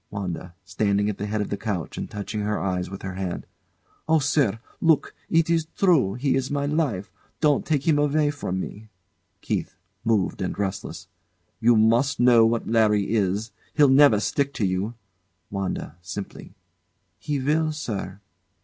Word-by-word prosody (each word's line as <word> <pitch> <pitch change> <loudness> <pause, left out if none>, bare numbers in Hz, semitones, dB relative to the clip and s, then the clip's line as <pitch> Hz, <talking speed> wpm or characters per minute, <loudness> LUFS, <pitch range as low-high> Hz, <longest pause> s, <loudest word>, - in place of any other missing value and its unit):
WANDA. 90 -3 -5
[Standing 100 +1 +1
at 100 - -10
the 105 - -3
head 105 0 -1
of 105 - -4
the 100 - -1
couch 100 -8 -3
and - - -5
touching 105 0 -5
her 105 +1 -1
eyes 90 -2 -2
with 95 +1 -8
her 95 -1 -4
hands] 95 -1 -4 0.6
Oh, 160 - +5
sir! 140 -7 +2 0.2
Look! 160 -3 +3 0.2
It 165 0 +3
is 165 -1 +1
true. 155 - +3
He 135 +2 0
is 135 0 0
my 145 -1 -1
life. 140 - -1 0.3
Don't 150 -3 +3
take 150 -2 0
him 150 -3 +4
away 145 0 +2
from 95 -10 -3
me. 110 +3 -7 0.5
KEITH. - - -3 0.3
[Moved 110 -5 +1
and 95 - -3
restless] 100 -1 -4 0.5
You 115 +1 +5
must 115 +5 +3
know 120 -2 +6
what 115 0 -1
Larry 105 -2 +2
is. 105 +1 0 0.2
He'll 145 -3 +6
never 135 -5 +6
stick 140 +5 -1
to 110 - 0
you. 95 +5 -1 0.6
WANDA. 95 -5 -4
[Simply] 95 +2 -8 0.6
He 145 -1 -2
will, 155 +4 +1
sir. 105 -10 -5
110 Hz, 165 wpm, -24 LUFS, 100-145 Hz, 0.6 s, know